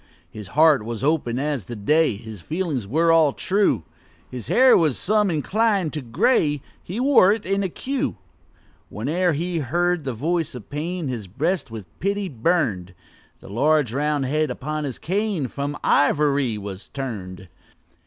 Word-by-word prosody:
His 105 -3 -9
heart 155 -7 +6
was 115 +2 -5
open 140 -5 +1
as 140 -6 -2
the 120 - -7
day, 150 +5 +2
His 110 -2 -10
feelings 155 - -3
all 165 +5 +4
were - - -9
true; 195 - +1 0.5
His 125 -4 -7
hair 260 +1 +6
was 155 -7 +2
some 210 0 +2
inclined 190 +2 +1
to 150 - -3
gray 145 - +1 0.2
He 190 +7 -6
wore 255 -8 +5
it 215 0 -2
in 195 +1 0
a 190 - -1
queue. 265 - -3 0.7
Whene'er 165 - 0
he 170 +3 -2
heard 175 +4 0
the 130 -2 -3
voice 160 +5 -1
of 120 -1 -10
pain, 165 +3 -3
His 115 -6 -4
breast 155 - -1
with 110 -3 -8
pity 200 +2 -1
burn'd; 110 - 0 0.5
The - - -12
large, 140 +2 +2
round 145 0 0
head 155 +3 0
upon 150 +2 -4
his 130 -4 -5
cane 195 -5 -1
From 140 +3 -4
ivory 145 -5 +2
was 100 -2 -7
turn'd. 95 -9 -6
150 Hz, 160 wpm, -23 LUFS, 120-175 Hz, 0.7 s, heart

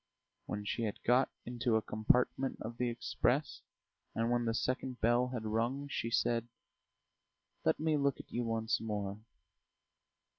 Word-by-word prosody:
When 105 0 -3
she 115 +2 -1
had 105 - -2
got 125 +2 +4 0.2
into 120 -1 0
a 110 - +3
compartment 125 +5 +2
of 115 +2 -6
the 125 0 +1
express, 120 0 0 0.5
and 115 +1 +1
when 120 -1 +2
the 115 - +1
second 130 +1 -1
bell 120 +2 +3
had 125 -3 -4
rung, 120 +6 0
she 115 - -1
said: 115 0 +1 1.2
"Let - - +3
me 155 -1 +2
look 140 -1 +1
at - - -11
you 120 - -1
once 115 -1 0
more 105 -2 -3
120 Hz, 150 wpm, -34 LUFS, 110-125 Hz, 1.2 s, got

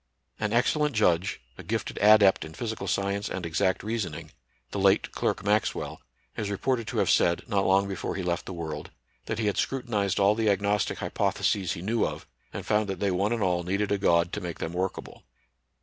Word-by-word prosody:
An 105 -1 -1
excellent 145 +4 +2
judge, 95 - +2 0.2
a - - -7
gifted - - -3
adept 105 -2 +6
in 80 0 -10
physical 110 -2 -4
science 100 +1 -1
and 95 -2 -4
exact 95 +3 0
reasoning, 100 -8 -4 0.4
the 100 - -3
late 95 +1 +3
Clerk - - -1
Maxwell, 105 0 0 0.3
is 105 - -3
reported 115 +3 -1
to - - -4
have - - +2
said, 85 0 +2
not 100 -1 +1
long 95 +1 +4
before 95 -2 -4
he 95 - -3
left 85 -1 -2
the - - -5
world, 80 -3 -5 0.4
that 110 - -2
he 110 - -1
had 105 - 0
scru 135 -2 -1
tinized 100 -4 0
all 100 +1 +5
the 110 0 +1
agnostic 100 0 +1
hypotheses 95 -4 0
he 85 - -7
knew 110 +3 +1
of, - - -3 0.3
and - - -6
found 105 0 +1
that 95 -2 -3
they 100 -1 +1
one 100 +4 +1
and 115 -3 0
aU 90 -2 +1
needed 100 +4 -1
a 100 - +1
God 85 -2 +2
to 105 - -3
make 85 -2 -5
them 80 - -4
workable. 95 +2 -4
100 Hz, 205 wpm, -27 LUFS, 90-105 Hz, 0.4 s, adept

